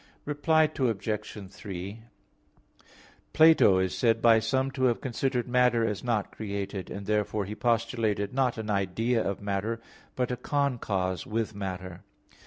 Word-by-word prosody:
Reply 155 +2 +3 0.2
Obj. 105 -4 -2
3: 100 +2 -7 1.3
Plato 155 -12 +6
is 95 -1 0
said 115 -2 +2
by 115 -1 +6
some 130 +4 0
to 130 0 0
have 120 -2 +2
considered 130 -1 -1
matter 125 -2 +3
as 105 -3 -3
not 115 -5 -1
created; 100 -2 -5
and 100 0 -6
therefore 105 0 0
he 105 - -5
postulated 115 -3 0
not 130 -3 +1
an 110 -1 -3
idea 110 +4 0
of 100 +1 -3
matter 100 +3 -2 0.4
but 125 -1 -1
a 125 - -2
concause 115 - -1
with 110 0 -2
matter. 95 -3 -6
110 Hz, 140 wpm, -28 LUFS, 100-125 Hz, 1.3 s, Plato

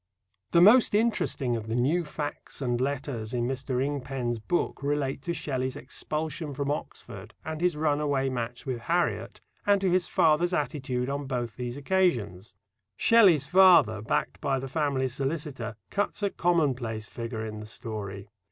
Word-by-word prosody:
The 170 - +4
most 220 +2 +7
interesting 210 - +1
of 110 -1 -5
the 110 - -2
"new 145 +9 +2
facts 150 -1 -6
and 120 -3 -1
letters" 130 -4 -3
in 120 - 0
Mr. 130 -1 -2
Ingpen's 130 -4 -3
book 175 +8 -1
relate 140 -1 -1
to 170 +5 -2
Shelley's 130 -4 -2
expulsion 150 +3 -4
from 140 +1 -2
Oxford 110 -7 -7
and 160 0 -4
his 175 -3 +1
runaway 145 -3 +1
match 120 -1 -4
with 130 -3 -3
Harriet, 170 +9 -1 0.2
and 205 -1 +4
to 190 -2 +1
his 180 -1 +2
father's 170 +3 +3
attitude 130 -3 -2
on 140 0 -3
both 120 -4 -3
these 125 +1 -5
occasions. 120 - 0 0.4
Shelley's 190 - +5
father, 170 - +6
backed 110 - -2
by 135 -1 +1
the 135 +1 -4
family 135 -2 0
solicitor, 135 -3 -3 0.2
cuts 205 +1 -1
a 200 - +1
commonplace 130 -11 0
figure 115 -1 -5
in 110 -1 -6
the 105 - -8
story. 100 -3 -6
135 Hz, 155 wpm, -28 LUFS, 120-160 Hz, 0.4 s, most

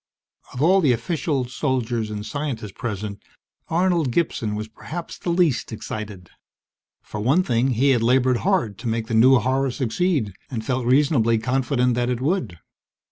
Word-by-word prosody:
Of 125 - -2
all 190 +4 +5
the 140 -7 +4
officials, 130 0 -2
soldiers, 120 -6 -1
and 105 0 -5
scientists 135 -8 -4
present, 105 -2 -5 0.5
Arnold 170 -4 +1
Gibson 115 -7 -1
was 110 +1 -4
perhaps 160 +10 -7
the - - -4
least 170 -9 +1
excited. 105 -4 -7 0.7
For 105 - -7
one 135 - +3
thing, 120 -3 +1
he 135 +4 +3
had 120 -3 +2
labored 125 +1 +3
hard 170 - 0
to 120 - -5
make 115 0 -1
the 115 - -5
new 125 +4 +6
horror 130 +2 +1
succeed 130 - -1 0.2
and 115 -5 -5
felt 125 -2 -1
reasonably 125 -4 +3
confident 125 +1 +1
that 120 +1 0
it 125 -2 -1
would. 145 - -1
125 Hz, 160 wpm, -23 LUFS, 110-145 Hz, 0.7 s, new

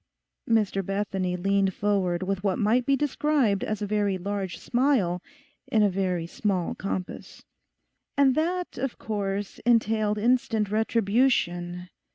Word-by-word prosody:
Mr 210 -3 +2
Bethany 190 -2 -2
leaned 195 +1 +1
forward 190 -4 0
with 195 0 -2
what 195 -2 +1
might 235 +5 +2
be 275 - +4
described 280 -6 +1
as 215 0 -2
a - - 0
very 205 -2 0
large 195 0 -4
smile 240 -9 +1 0.5
in 215 -2 +3
a 205 - +3
very 180 -3 -1
small 185 0 -1
compass. 190 -2 -6 0.7
'And 275 -2 +5
that, 350 +5 -1
of 270 -1 -3
course, 200 -2 -3
entailed 220 -2 +2
instant 225 -2 +1
retribution. 200 -6 +1
205 Hz, 130 wpm, -26 LUFS, 190-230 Hz, 0.7 s, And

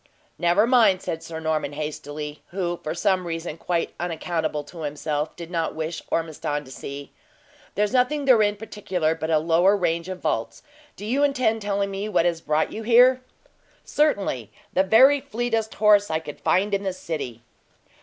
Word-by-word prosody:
"Never 175 +5 +4
mind," 225 -7 +4
said 160 - -3
Sir 160 -1 -7
Norman, 155 -2 -1
hastily, 150 0 -6
who, 175 -2 -3
for 155 +1 -4
some 185 -1 +1
reason 165 -1 -4
quite 170 0 -2
unaccountable 165 -3 -2
to 165 +4 -12
himself, 150 0 -3
did 170 0 -9
not 165 -2 -1
wish 160 +1 -4
Ormiston 150 -2 -2
to 130 - -13
see. 140 +2 -8 0.6
"There's 210 +3 +1
nothing 275 +3 +2
therein 215 -6 +4
particular, 190 -6 -2
but 160 0 -4
a 160 - +4
lower 170 +6 +3
range 170 -1 -1
of 185 -1 -5
vaults. 115 - -2 0.3
Do 205 - -8
you 265 +6 +1
intend 255 -6 +1
telling 200 -1 -1
me 195 +2 -4
what 175 - +2
has 170 -2 0
brought 155 +1 0
you 220 - -5
here?" 250 +3 +5 0.6
"Certainly; 200 - 0 0.2
the 185 - +4
very 260 +9 +6
fleetest 225 -1 -2
horse 210 -1 +4
I 160 - +1
could 155 -2 -8
find 200 +3 +1
in 200 - +1
the 190 -2 -2
city." 150 -10 -5
175 Hz, 170 wpm, -24 LUFS, 160-210 Hz, 0.6 s, very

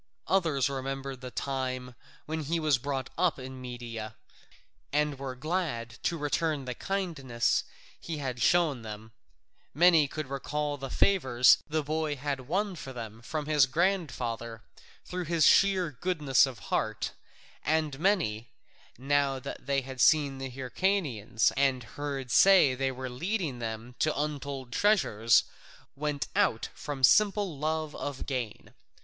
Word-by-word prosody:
Others 160 -9 +2
remembered 135 -1 -4
the 130 - -6
time 130 -1 -3 0.3
when 160 +1 -3
he 165 +3 0
was 155 -5 +2
brought 135 0 -3
up 180 -2 +2
in 130 0 -8
Media, 120 -3 -6 0.8
and 150 -1 0
were 135 -2 -5
glad 135 -7 -3
to 170 - 0
return 150 -1 -1
the 125 - -3
kindnesses 150 - -1 0.4
that - - -14
he 165 -2 -3
had 130 -4 -4
shown 160 -4 +3
them; 110 0 -8 0.6
many 165 -2 +6
could 155 +2 -5
recall 145 +2 -3
the 135 -1 -6
favours 130 -12 +4
the 155 0 -1
boy 155 0 -1
had 135 -2 -4
won 195 +4 0
for 135 -5 -8
them 115 -3 -8
from 150 +4 -4
his 150 -3 +4
grandfather 125 - -1 0.4
through 180 -1 -4
his 165 -1 +3
sheer 190 -4 +4
goodness 145 -2 +2
of 130 -3 -7 0.2
heart; 110 -1 -1 0.5
and 155 -3 0
many, 150 - +1 0.5
now 140 +1 +1
that 130 - -8
they 140 -1 +2
had 130 -1 -6
seen 145 -4 +4
the 135 0 -4
Hyrcanians 130 - 0
and 135 -2 +2
heard 135 +1 -5
say 190 -9 +6
they 135 +1 -1
were 130 0 -5
leading 155 - -2
them 115 +1 -5
to 155 -2 +1
untold 140 -4 -4
treasures, 115 - +4 0.5
went 145 0 -2
out 115 - +1
from 140 -3 -6
simple 205 - +4
love 155 0 -2
of 140 -2 -5
gain. 125 -6 -4
140 Hz, 145 wpm, -29 LUFS, 125-155 Hz, 0.8 s, many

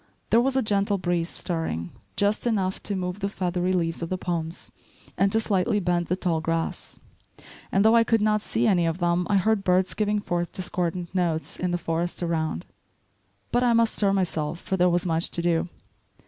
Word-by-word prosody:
There 230 +3 +6
was 265 +1 0
a 265 - +2
gentle 200 -1 +1
breeze 175 -2 -1
stirring, 125 - -3 0.2
just 205 +4 +1
enough 195 -5 0
to 205 - -2
move 180 +1 -3
the 200 0 -1
feathery 180 -2 -1
leaves 170 -3 0
of 165 - -3
the 185 - -1
palms 170 -2 -4 0.4
and 195 0 +2
to 225 - +3
slightly 205 -1 +1
bend 175 -2 0
the 180 - +1
tall 170 -4 0
grass; 165 0 -2 0.7
and 195 +2 +3
though 220 +1 +6
I 230 - +6
could 225 0 +2
not 210 0 +2
see 225 +2 -1
any 180 -6 +3
of 165 0 -1
them, 175 0 +1
I 205 - +4
heard 205 +1 +2
birds 185 0 +2
giving 210 -1 0
forth 175 -4 -2
discordant 180 -1 -3
notes 170 -4 -1
in 180 - 0
the 175 - 0
forest 170 +1 -2
around. 160 - -1 0.9
But 245 - +2
I 245 -1 +3
must 230 -1 +3
stir 200 -2 +2
myself, 170 -4 -1
for 190 - -2
there 180 -1 +4
was 175 0 +1
much 165 -1 +1
to 170 - -2
do. 170 0 +1
180 Hz, 200 wpm, -25 LUFS, 170-205 Hz, 0.9 s, There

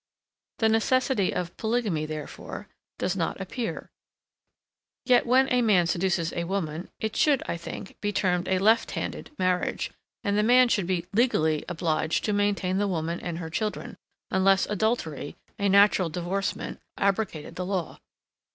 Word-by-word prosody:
The 225 - +3
necessity 225 -1 +2
of 175 -1 -3
polygamy, 220 -9 0
therefore, 155 -2 -7 0.3
does 185 - -1
not 175 0 -2
appear; 225 +5 -4 1.1
yet 245 -2 +4
when 260 +2 +5
a 250 - +4
man 200 -7 +4
seduces 170 -1 0
a 170 -1 -2
woman, 170 -2 -3
it 220 -1 -3
should 290 -4 +3
I - - -2
think, 170 +3 -8
be 205 - 0
termed 180 -3 0
a 190 - +2
LEFT 220 +4 +3
HANDED - - -4
marriage, 185 -1 0 0.3
and 200 0 0
the 210 - +3
man 245 +3 +5
should 195 -6 +1
be 180 -2 -1
LEGALLY 160 - +2
obliged 160 -2 0
to 210 - 0
maintain 200 -2 +1
the 205 - +1
woman 170 -2 -2
and 170 -2 -4
her 165 -2 -6
children, 210 +6 -3 0.4
unless 190 0 +4
adultery, 205 - -2 0.2
a 200 0 +2
natural 200 -2 +5
divorcement, 180 +4 -3 0.2
abrogated 195 -6 -1
the 180 - -3
law. 185 -4 -3
190 Hz, 150 wpm, -27 LUFS, 170-215 Hz, 1.1 s, when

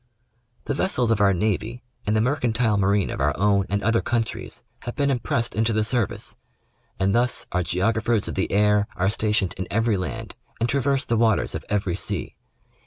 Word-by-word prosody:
The - - -2
vessels 130 - +1
of 110 -2 +2
our 100 -1 +5
navy 110 +5 -1 0.2
and 105 - +2
the 110 - +3
mercantile 120 -3 +1
marine 100 0 +2
of - - -4
our 70 0 +1
own 100 0 +2
and 100 0 -1
other 115 +2 +2
countries 115 -2 -3 0.2
have 120 - -6
been 140 -1 +1
impressed 120 -2 -1
into 110 +1 +1
the 110 0 +2
service, 120 -1 -1 0.6
and 95 +1 +2
thus 120 +2 +1
our 90 - +1
geographers 110 +5 0
of - - -4
the 95 - -1
air 105 0 +3
are 95 0 +1
stationed 105 -4 0
in 95 - -3
every 115 -1 +1
land 110 +4 -5 0.2
and 115 - +1
traverse 140 +1 +1
the 115 - 0
waters 110 -2 +2
of - - -5
every 100 -4 0
sea. 100 -3 -1
110 Hz, 185 wpm, -24 LUFS, 100-120 Hz, 0.6 s, our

